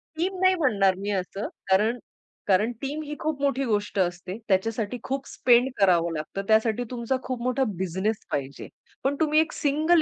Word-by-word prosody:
Team 370 +4 -1
नाही 375 0 +5
म्हणणार 200 - +3
मी 200 +1 -4
असं. 195 +1 -3 0.2
कारण 215 +6 +3 0.5
कारण 205 +5 +3
टीम 290 +3 -3
ही 300 0 -6
खूप 305 -3 -2
मोठी 275 -1 +1
गोष्ट 205 -3 -1
असते. 180 +2 -1
त्याच्यासाठी 220 +4 0
खूप 270 +1 -3
स्पेंड 245 +1 +3
करावं 170 -3 +3
लागतं. 155 +5 -4
त्यासाठी 220 +2 +3
तुमचा 245 +1 -1
खूप 255 -2 -4
मोठा 255 +1 +1
बिझनेस 190 +4 -2
पाहिजे. 140 0 -4 0.4
पण 275 +2 +1
तुम्ही 310 0 +3
एक 320 - +1
सिंगल 310 +4 +3
230 Hz, 170 wpm, -26 LUFS, 195-275 Hz, 0.5 s, नाही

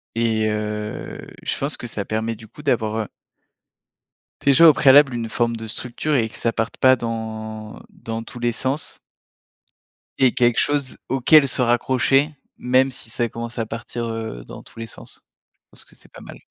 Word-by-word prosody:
Et 110 -2 +1
heu, 105 0 -4 0.2
je - - -1
pense 140 +1 -1
que 120 - -7
ça 105 -3 -4
permet, 110 +1 -2
du 110 +1 -13
coup, 150 - -14
d'avoir 110 -6 0
heu 105 - -5 1.4
déjà 140 +4 +7
au 155 - +8
préalable, 140 0 +6
une 115 -1 -3
forme 115 +1 0
de 115 - -7
structure 125 +7 -2
et 115 -4 +1
que - - -11
ça 115 - 0
parte 115 +1 -2
pas 130 0 +6
dans 110 -2 -6
dans 115 0 -6
tous 120 - -10
les 120 0 +1
sens 135 +6 -2 1.2
et 130 -2 +5
quelque 120 -2 +2
chose 145 -3 +1
auquel 140 +3 +5
se 125 - +1
raccrocher, 130 +4 +2 0.3
même 130 +2 +3
si 120 - -7
ça 120 +1 -1
commence 115 +2 -6
à 115 - 0
partir, 115 +1 -5
heu, 110 - -5
dans - - -10
tous - - -15
les 115 - -5
sens. - - -13 0.4
Je - - -72
pense - - -11
que - - -20
c'est - - -20
pas - - -13
mal. - - -11
115 Hz, 185 wpm, -22 LUFS, 110-130 Hz, 1.4 s, au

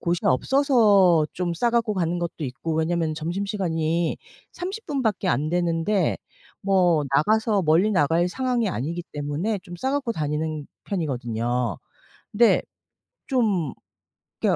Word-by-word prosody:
곳이 175 0 0
없어서 200 - +4
좀 175 -1 -2
싸갖고 235 +3 +1
가는 175 -2 -1
것도 170 -2 -4
있고 135 +5 -4
왜냐하면 160 0 0
점심시간이 170 -1 -1 0.3
30 390 +5 -6
분밖에 225 - -1
안되는데 170 +4 +1 0.4
뭐 180 -6 +3
나가서 215 +4 +2
멀리 170 +6 +3
나갈 170 -1 +2
상황이 250 0 0
아니기 170 +2 -3
때문에 150 +9 -2
좀 175 -1 -9
싸갖고 265 +4 -1
다니는 155 -3 -3 0.2
편이거든요. 120 - -2 0.5
근데 230 +2 +4 0.7
좀 210 - +1 0.7
이게 - - +3
175 Hz, 270 characters per minute, -24 LUFS, 155-215 Hz, 0.7 s, 없어서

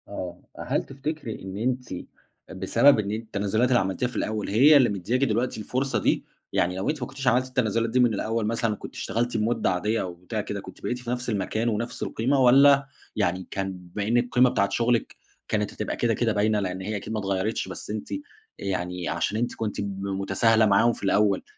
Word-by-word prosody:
آه. 90 -3 -6 0.2
أ - - -7
هل - - 0
تفتكري 140 -3 -5
إن 95 0 -6
أنتِ 125 +1 -2 0.6
بسبب 115 +8 +4
إن 100 -1 -2
التنازلات 110 +1 0
اللي 125 - +4
عملتيها 95 +6 -1
في 125 - -10
الأول، 110 -1 -2
هي 140 +9 +7
اللي 130 -4 +5
مدِّياكِ 105 +7 -1
دلوقتي 120 -1 0
الفرصة 130 +1 -1
دي؟ - - +1 0.3
يعني 90 +1 +1
لو 95 - -1
أنتِ 150 -2 -2
ما 125 - -2
كنتيش 135 0 -6
عملتِ 125 +2 +3
التنازلات 115 -3 0
دي 125 +3 +1
من 120 -3 +4
الأول 110 +2 -1
مثلًا، 115 -1 0
وكنت - - -9
اشتغلتِ 120 +1 -1
بمدة 110 +2 +1
عاديّة 105 +5 0
أو 90 -2 -4
بتاع 85 +1 -4
كده، - - -5
كُنتِ - - -12
بقيتِ 125 - -2
في 120 -1 -8
نفس 125 0 -2
المكان 110 +2 -1
ونفس 115 +2 -3
القيمة، 135 +5 0
والّا 135 +2 +6 0.3
يعني 90 +1 0
كان 95 0 -2
بما 90 +3 -5
إنِّك 120 +2 +3
القيمة 125 +1 +4
بتاعة 100 -4 +1
شغلك 120 0 0 0.3
كانت 105 -1 -1
هتبقى 105 - -3
كده 120 -1 +1
كده 115 0 +1
باينة، 105 0 +2
لأن 95 -1 -3
هي 105 +3 -3
أكيد 105 +2 -6
ما 110 - -1
اتغيرتش 100 +2 -1
بس - - -8
أنتِ 105 0 -5
أ - - 0 0.4
يعني 90 -2 -3
عشان 85 +5 -1
أنتِ 120 +2 -1
كُنتِ 105 -2 -3
ب 100 -1 -4
متساهلة 100 +4 +2
معاهم 110 +3 +4
في - - -11
الأول، 100 0 +2
110 Hz, 205 wpm, -26 LUFS, 100-125 Hz, 0.6 s, هي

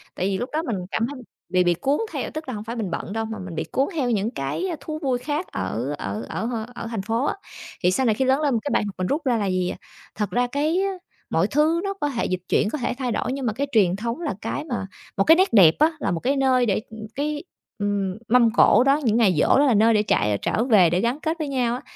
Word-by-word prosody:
Tại 185 - -2
vì 195 -1 0
lúc 245 - -4
đó 315 - +1
mình 235 -10 -2 0.2
cảm 230 +1 0
thấy 275 -2 -8 0.3
bị 180 0 +3
bị 175 -1 +3
cuốn 275 - 0
theo - - -3
tức 310 -2 -6
là 255 - -4
hông 210 -1 -5
phải 230 +2 -6
mình 215 -6 -3
bận 190 - -4
đâu 225 0 -2
mà 220 -1 -6
mình 170 - -7
bị - - -1
cuốn 270 - +1
theo 260 -5 0
những 215 0 0
cái 135 - -3
thú 310 +2 -6
vui 260 -4 +1
khác 295 +6 -3
ở 130 +6 -3
ở 100 +3 -4
ở 225 - -3
h 245 - -3 0.2
ở 230 - -5
thành 225 -4 -3
phố 225 +6 -1
á, - - 0 0.5
thì 180 - +4
sau 260 +8 +1
này 220 -3 +3
khi 265 - 0
lớn 265 +3 +2
lên 290 -3 +1
một 230 - +2
cái 290 - -2
bài - - +2
học 200 - -6
mình 185 0 -1
rút 300 +3 0
ra 245 -3 +2
là 205 - -1
gì, 185 -1 0
à, - - -5 0.4
thật 210 -3 -2
ra 245 0 +1
cái 300 +7 0 0.5
mọi 170 +5 +2
thứ 310 +5 +2
nó 395 - -2
có 295 -7 -2
thể 235 -4 -2
dịch 185 0 -2
chuyển, 210 - +2
có 305 - -3
thể 245 - -2
thay 250 -3 -2
đổi, 250 +3 -1
nhưng 270 -2 -4
mà 220 - 0
cái 280 +6 -2
truyền 190 -5 +3
thống 235 - -4
là 300 - -2
cái 295 - -3
mà 240 -9 -3 0.3
một 195 - +4
cái 325 - +7
nét 375 -5 +2
đẹp 180 -7 +7
á, 310 +2 +5
là 195 - -1
một 165 - -1
cái 270 +8 0
nơi 260 -2 +3
để, 210 -2 +1
ừm, 220 0 -11 0.2
cái, 295 +1 -2 0.3
ừm, 200 -2 -1
mâm 235 -1 +4
cỗ 240 0 +6
đó, 275 +2 +3
những 225 -3 +2
ngày 210 -6 +4
giỗ - - +3
đó 290 - +5
là 260 - +4
nơi 225 +2 +4
để 210 -1 +3
trạ 105 - +1
trở 225 - 0
về 210 -9 +5
để 175 +2 +1
gắn 240 +6 0
kết 320 +1 -2
với 310 - -2
nhau 250 -3 0
á, 250 - -6
235 Hz, 290 wpm, -23 LUFS, 200-280 Hz, 0.5 s, cái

